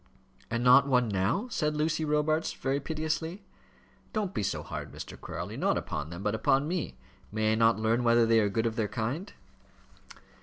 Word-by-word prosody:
"And 115 +1 -1
not 130 +2 +7
one 125 -3 +3
now?" 100 - 0
said 150 -6 0
Lucy 155 +1 0
Robarts, 155 +1 +1
very 135 +1 -1
piteously. 160 +5 -3 0.7
"Don't 210 -4 -1
be - - -1
so 100 - -2
hard, - - -6
Mr. - - -8
Crawley, - - -6
not - - +1
upon 75 0 -4
them, 85 +3 -7
but 105 - 0
upon 135 +6 +2
me. 165 - -3 0.3
May 110 +1 +1
I - - +3
not 115 0 +4
learn 110 +2 +1
whether 120 0 +5
they 115 0 +4
are 105 -2 +2
good 110 +3 0
of 115 0 -1
their 110 -2 +1
kind?" 125 - -3
125 Hz, 185 wpm, -29 LUFS, 110-155 Hz, 0.7 s, not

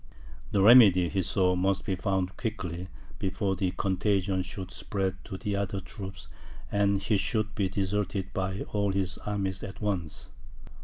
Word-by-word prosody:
The 95 - +2
remedy, 100 -6 +8
he 95 - 0
saw, 90 +1 +2
must 95 +2 +1
be 100 -4 0
found 95 -1 -1
quickly, 95 -6 -4 0.3
before 95 0 -1
the 95 0 0
contagion 95 0 0
should 95 0 -6
spread 95 -2 -2
to 95 - -6
the 100 +1 -2
other 100 0 -1
troops, 95 +1 -8 0.4
and 100 -1 +2
he 105 0 +1
should 110 +2 0
be 100 -3 0
deserted 95 0 -2
by 95 0 -2
all 100 -2 +1
his 95 -2 -1
armies 95 -2 -2
at 100 -4 -7
once. 95 -7 -3
95 Hz, 155 wpm, -29 LUFS, 95-100 Hz, 0.4 s, remedy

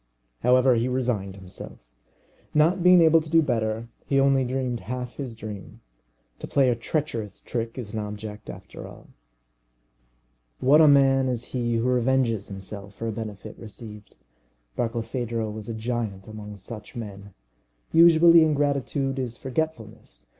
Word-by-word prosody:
However, 125 - +4
he 120 +1 +1
resigned 120 -7 -1
himself. 95 -1 -9 0.8
Not 165 +5 +4
being 180 0 +7
able 165 0 +6
to 155 - -10
do 165 0 +5
better, 115 -3 -1 0.2
he 135 - +2
only 135 -1 +4
dreamed 125 -1 -2
half 125 +5 -6
his 130 -5 -5
dream. 105 -3 -9 0.6
To - - -6
play 135 -2 +3
a - - +1
treacherous 115 - -3
trick 115 0 -4
is 115 -4 -6
an 110 - -2
object 105 0 -7
after - - -9
all. - - -14 1.5
What 145 +5 +6
a 155 - +7
man 135 -2 +5
is 120 -2 -2
he 120 -2 0
who 115 - 0
revenges 125 -4 +1
himself 100 +1 -8
for 115 - -4
a - - -1
benefit 110 -1 -7
received! 105 -1 -11 0.6
Barkilphedro 115 -1 -2
was 110 +1 -8
a 115 - -3
giant 110 -4 -3
among 105 -1 -9
such 105 +6 -10
men. 100 -3 -8 0.6
Usually, 170 0 +7
ingratitude 140 -2 0
is 120 -2 -4
forgetfulness. 125 -6 -5
120 Hz, 145 wpm, -25 LUFS, 110-135 Hz, 1.5 s, being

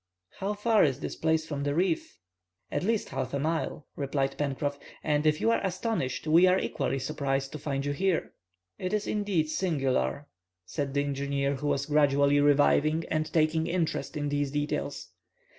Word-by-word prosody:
"How 200 +2 -1
far 215 +1 +3
is 140 -3 +1
this - - -5
place 160 0 +1
from 145 -3 -4
the 145 0 -1
reef?" 320 - 0 0.5
"At - - -1
least 220 +3 0
half 135 +1 -3
a - - 0
mile," 155 -1 -2
replied 135 -1 -1
Pencroff, 145 0 -2 0.2
"and 150 0 +1
if 150 0 +3
you 230 - +3
are 230 - +1
astonished, 190 - -2
we 165 +4 +6
are 185 +1 +4
equally 135 - -1
surprised 135 0 -2
to 155 - -6
find 140 -1 -2
you 145 - 0
here." 185 +2 0 0.5
"It 185 +2 -3
is 210 -1 0
indeed 195 -7 0
singular," 140 - 0 0.4
said 140 +7 -3
the 140 - +2
engineer, 140 0 -1
who 145 +2 -3
was 140 -1 0
gradually 145 -1 +3
reviving 145 +2 +3
and 155 0 0
taking 160 0 +2
interest 170 -2 -1
in 145 -1 -1
these 145 -1 0
details. 145 +1 -3
150 Hz, 175 wpm, -28 LUFS, 140-170 Hz, 0.5 s, we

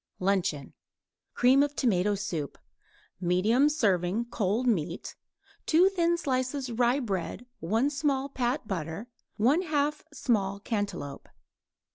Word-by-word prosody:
LUNCHEON 180 -7 0 0.6
Cream 260 +3 +5
of 290 0 0
tomato 205 -4 +2
soup; 170 -8 -4 0.6
medium 200 +10 +3
serving 205 - +1
cold 215 +4 0
meat; 175 -7 -1 0.5
2 350 +4 +5
thin 345 -3 +1
slices 260 -3 -2
rye 240 +3 +2
bread; 200 -1 -3
1 225 - +1
small 280 -2 0
pat 250 -3 -2
butter; 175 +3 -4 0.3
1/2 295 - +2
small 200 -8 0
cantaloupe. 200 - -4
230 Hz, 105 wpm, -28 LUFS, 190-275 Hz, 0.6 s, Cream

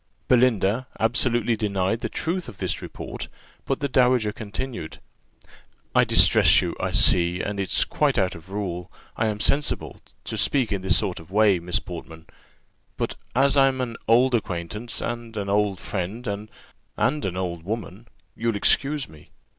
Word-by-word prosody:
Belinda 120 -1 +3
absolutely 120 0 +2
denied 100 0 -1
the - - -4
truth 175 -2 -3
of 105 - -12
this 90 -5 -2
report: - - -7 0.4
but 135 - -2
the 140 - +1
dowager 125 -4 +3
continued, 110 -3 -6 0.9
"I - - +5
distress - - +6
you, - - -2
I - - -1
see, 85 0 +4
and 100 +1 -3
it's 95 - +2
quite - - 0
out 95 -1 +1
of 85 +3 -13
rule, 95 -3 -4 0.2
I 110 - 0
am 105 -1 -2
sensible, 145 +7 0 0.2
to 110 - -4
speak 115 +4 +1
in 100 -2 -1
this 95 -1 +4
sort 90 - 0
of 80 - -14
way, 100 -2 +4
Miss 85 +1 -1
Portman; 80 -2 -8 0.7
but - - -2 0.2
as 135 +2 +4
I'm 135 -1 +4
an 120 -2 -3
old 125 +3 +4
acquaintance, 105 +1 -3
and 120 -2 -5
an 100 -1 -3
old 100 -2 +1
friend, 100 +7 -4
and 105 0 -4 0.5
an 100 -11 0
old 85 -3 -3
woman, 105 +3 -6 0.3
you'll 115 -1 -1
excuse 140 +7 +2
me. 75 -2 -17
105 Hz, 160 wpm, -24 LUFS, 95-120 Hz, 0.9 s, distress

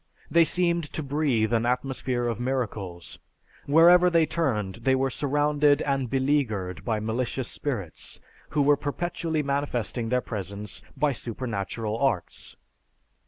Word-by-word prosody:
They 170 0 +6
seemed 170 -1 +1
to 155 - -3
breathe 135 -6 +1
an 115 0 +2
atmosphere 125 -1 -1
of 115 -2 -2
miracles. 100 -10 -3 0.5
Wherever 175 +4 +7
they 165 -2 +4
turned 115 - -1
they 130 +2 +3
were 135 0 0
surrounded 145 +1 +2
and 135 -3 -1
beleaguered 110 -10 0
by 110 +1 0
malicious 120 +3 -2
spirits, 105 - -5 0.3
who 145 - +1
were 145 0 +4
perpetually 160 +1 -2
manifesting 125 -5 -1
their 125 +1 +2
presence 100 -1 -5 0.2
by 145 0 +2
supernatural 115 -2 -4
arts. 135 -11 -2
130 Hz, 125 wpm, -26 LUFS, 110-145 Hz, 0.5 s, Wherever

